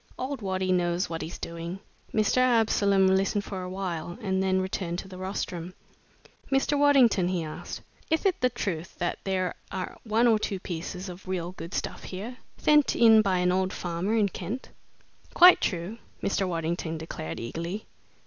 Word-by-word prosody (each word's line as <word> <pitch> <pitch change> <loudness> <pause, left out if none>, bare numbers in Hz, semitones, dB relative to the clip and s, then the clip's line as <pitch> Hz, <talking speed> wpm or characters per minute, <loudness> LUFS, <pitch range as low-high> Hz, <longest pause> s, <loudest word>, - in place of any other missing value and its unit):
"Old 260 0 -4
Waddy 190 -1 -1
knows 175 0 +1
what 165 - -3
he's 160 +2 -6
doing!" 170 +2 -6 0.3
Mr. 215 +2 +2
Absolom 220 -6 +4
listened 195 +1 +1
for 190 -1 -5
a 180 - -5
while 180 -2 -4
and 190 -4 0
then 190 0 +2
returned 185 -2 -2
to 190 - -6
the 185 -1 -10
rostrum. 185 -2 -4 0.8
"Mr. 270 +2 +2
Waddington," 270 -10 +5
he 180 -2 -1
asked, 155 -1 -7 0.3
"ith 320 +5 +1
it 380 -2 +2
the 250 - +4
truth 190 -9 -4
that 175 - -2
there 185 -2 0 0.2
are 185 -1 -4
one 225 +1 +2
or 225 -2 +5
two 200 -2 -2
pieces 180 +2 -5
of 180 +1 -9
real 180 -2 -2
good 170 -2 -8
stuff - - -4
here, 215 +7 -6 0.2
thent 300 -2 +4
in 225 -2 +7
by 195 -3 +1
an 180 0 +2
old 185 +1 +1
farmer 175 +5 -2
in 215 -3 +4
Kent?" 240 +7 -5 0.7
"Quite 360 +1 +9
true," 185 +5 -2 0.2
Mr. 195 -1 +1
Waddington 165 -1 -2
declared, 85 - -6
eagerly. 170 - -4
190 Hz, 170 wpm, -27 LUFS, 175-215 Hz, 0.8 s, Quite